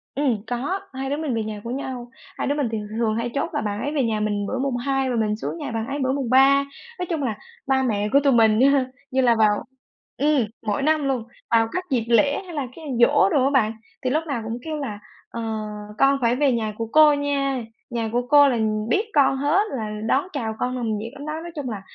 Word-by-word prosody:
Ừm, 260 -7 +1
có, 260 - -2
hai 265 +1 -4
đứa 285 - -1
mình 305 -4 -2
về 225 - -1
nhà 215 -1 -6
của 235 - -5
nhau, 255 -2 -5 0.3
hai - - -2
đứa 285 - +1
mình 290 -4 0
thì 225 - -1 0.2
rường 220 -2 +1
hay 230 +2 -1
chốt - - -1
là - - 0
bạn 205 -1 -3
ấy 290 - -2
về 280 - +2
nhà 220 -2 0
mình 205 -1 -1
bữa 260 - -2
mùng 265 -2 -1
2 270 +1 0
và 250 - -1
mình 215 -2 +1
xuống 220 - -5
nhà 290 -5 -5
bạn 225 0 -3
ấy 280 +1 -3
bữa 260 0 +1
mùng 270 -3 -2
3. 270 +2 +6 0.4
Nói 360 - -1
chung 320 -4 -1
là 220 -5 -2 0.3
ba 265 -1 +2
mẹ 210 -4 0
của 280 - +6
tụi 280 -2 +4
mình 220 -2 +4
á 265 +2 +6
ha, 275 -2 +3 0.3
như 265 - +2
là 240 -2 +4
vào 215 -2 +3 0.5
ừm, 290 -2 +3 0.2
mỗi 205 +3 0
năm 305 0 +2
luôn, 260 -4 0 0.3
vào 225 -1 +4
các 365 - -2
dịp 245 -5 0
lễ, 280 +7 +3
hay 355 - -9
là 280 -3 -2
cái 325 - -10 0.2
giỗ 285 +9 +5
đồ 290 -8 +2
á 275 - +3
bạn, 225 -6 +2 0.3
thì 255 - +1
lúc 310 +5 +1
nào 275 -6 -2
cũng 225 +1 -3
kêu 310 +1 -4
là 220 -8 -5 0.3
"Ờ, 230 - -5 0.6
con 275 0 +4
phải 235 0 +3
về 280 +1 +3
nhà 220 -3 -1
của 225 -1 -3
cô 305 -1 +7
nha, 280 -3 -1 0.3
nhà 230 -2 -2
của 245 +1 -1
cô 290 0 +7
là 245 - 0
nh 215 -1 -1
biết 410 - +2
con 270 -3 +4
hết 295 +8 +2 0.2
là 215 -2 -3 0.2
đón 275 +9 +2
chào 225 -6 -3
con 250 +1 -1
nồng 225 -4 -1
nhiệt 225 +4 -6
lắm 285 +1 -9
đó." 305 - -3
Nói 345 - -7
chung 285 -4 -4
là 210 -4 -5
260 Hz, 260 wpm, -23 LUFS, 225-285 Hz, 0.6 s, cô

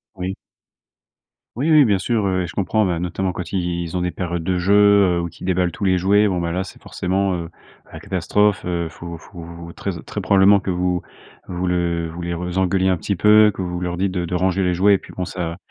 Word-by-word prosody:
Oui. 95 +1 -4 1.2
Oui, 145 +7 0
oui, 155 -2 +7
bien 105 -6 +3
sûr, 105 +2 0
heu 95 -1 0
et - - -4
je 90 - -9
comprends. 105 +2 +1
Bah, 85 -3 -1
notamment 90 +2 -2
quand 85 -2 -6
ils 85 -2 -2
ont - - -1
des 90 0 -1
périodes 85 -2 -4
de 90 +1 0
jeux, 100 -1 +4
heu, - - 0
ou 85 - -4
qu'ils 85 - -10
déballent 90 -1 +1
tous - - -7
les 95 -1 +3
jouets. 100 +4 +3
Bon, 90 -3 -1
bah, 85 -1 -2
là, 90 +2 -1
c'est 95 - -12
forcément, 95 +1 -1
heu, 85 -2 -4 0.4
la - - -9
catastrophe, 100 +3 +1
heu, 85 -2 -2
faut 85 +1 -8
faut 85 -1 -10
très - - -4
très 105 - -5
probablement 100 +1 +5
que 100 - -5
vous 90 -1 0 0.5
vous 90 +1 -3
le 85 -2 0
vous 85 +2 -8
les 85 0 -3
re 90 +1 -4
les 90 +1 -2
engueuliez 95 0 +2
un 95 - +2
petit 100 +5 -2
peu, 105 +4 +6
que 95 - -5
vous 90 0 -4
leur 90 -1 -3
dites 95 +1 0
de 90 -2 -2
de 90 - -3
ranger 95 +1 +1
les 90 -1 +1
jouets 100 +3 +4
et - - +4
puis, - - -14
bon, 90 - -4
ça 85 -2 -4
90 Hz, 245 wpm, -21 LUFS, 85-95 Hz, 1.2 s, oui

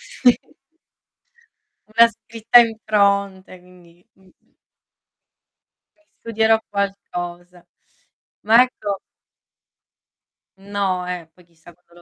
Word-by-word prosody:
Sì. 485 - 0 1.3
Una 230 +2 +5
scritta 230 +2 +2
in 230 -2 +3
fronte 200 -3 0
quindi 175 -1 -21
mh-mh. 190 -1 -29 1.4
Eh, 315 0 -37
studierò 225 0 +1
qualcosa. 180 -3 -6 0.8
Ma 225 +4 +6
ecco 205 -6 -4 1.6
No 195 -2 -3
eh, 175 -2 -6
poi 180 - -22
chissà 170 0 -20
quando 170 0 -34
200 Hz, 85 wpm, -20 LUFS, 180-225 Hz, 1.6 s, Ma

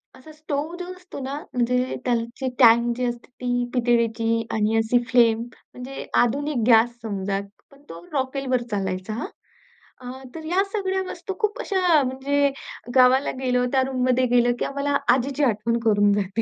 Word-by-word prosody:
असा 260 +4 -14
स्टोव्ह 310 +1 -4
जो 360 - -5
असतो 365 -4 -11
ना, 275 +2 -4 0.2
म्हणजे 250 +1 0
त्याची 235 +2 -2
टँक 235 0 +5
जी 250 - -1
असते 240 0 -4
ती 245 0 0
पितळेची 230 -2 +1
आणि 220 0 +1
अशी 225 +2 +2
फ्लेम 230 -2 +4
म्हणजे 250 +2 -9 0.2
आधुनिक 275 0 -1
गॅस 235 +1 +4
समजा. 200 -2 -2 0.3
पण 280 0 -19
तो 165 +1 -10
रॉकेलवर 260 -2 -1
चालायचा 190 +1 -3
हां. 235 - -4 0.7
अ, 255 +2 -8
तर 320 - -7
या 365 +4 +2
सगळ्या 380 -2 -1
वस्तू 360 +2 -6
खूप 425 -1 -1
अशा 360 -6 +2
म्हणजे 280 +2 0 0.5
गावाला 260 +2 +5
गेलो 250 -1 +1
त्या 265 - +4
रूममध्ये 255 -1 +1
गेलं 240 0 +4
की - - 0
आम्हाला 280 0 -1 0.2
आजीची 275 +3 -1
आठवण 230 -1 +1
करून 205 -1 +4
जाते. 205 +2 -1
250 Hz, 155 wpm, -23 LUFS, 230-280 Hz, 0.7 s, टँक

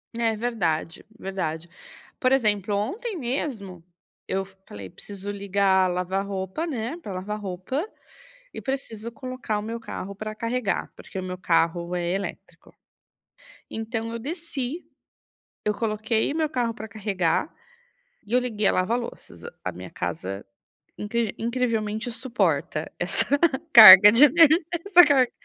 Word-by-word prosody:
É 230 -1 0
verdade, 190 -9 -2
verdade, 170 -4 -4 0.5
por 255 0 +2
exemplo, 210 -6 +1
ontem 380 - -3
mesmo 235 - -4 0.4
eu 195 0 -1 0.2
falei: 100 -2 -9
"Preciso 200 - -7
ligar 195 -1 +2
lavar-roupa, 190 - -3
né, 265 -1 -4
pra 205 - -7
lavar 200 +3 -5
roupa, 200 - -4 0.7
e - - -7
preciso 235 -4 -5
colocar 255 -5 -4
o - - -5
meu 230 +2 -5
carro 200 -3 -7
pra 215 +2 -6
carregar", 230 -3 -2
porque 190 - -8
o 185 - -5
meu 185 0 -5
carro 170 0 0
é 175 -1 -2
elétrico, 195 0 -7 1.0
então 225 0 -4
eu 230 - -4
desci, 310 +1 -5 0.8
eu 210 0 +1
coloquei 220 +2 -1
o 310 - -4
meu 315 -2 +1
carro 245 -5 -1
pra 220 - -8
carregar 200 - -1 0.7
e 210 - -14
eu 250 - +5
liguei 215 -5 -1
a - - +4
lava-louças, 230 +6 -3 0.2
a - - -2
minha 90 +1 -9
casa 90 +3 -5 0.5
incri 220 0 -2
incrivelmente 230 -1 -2
suporta 245 +1 -1
essa - - +2 0.5
carga 210 -3 +12
de 245 +6 +8
energi 325 +1 +5 0.2
essa 360 -3 +8
carga, 265 -4 +3
215 Hz, 135 wpm, -25 LUFS, 190-250 Hz, 1.0 s, carga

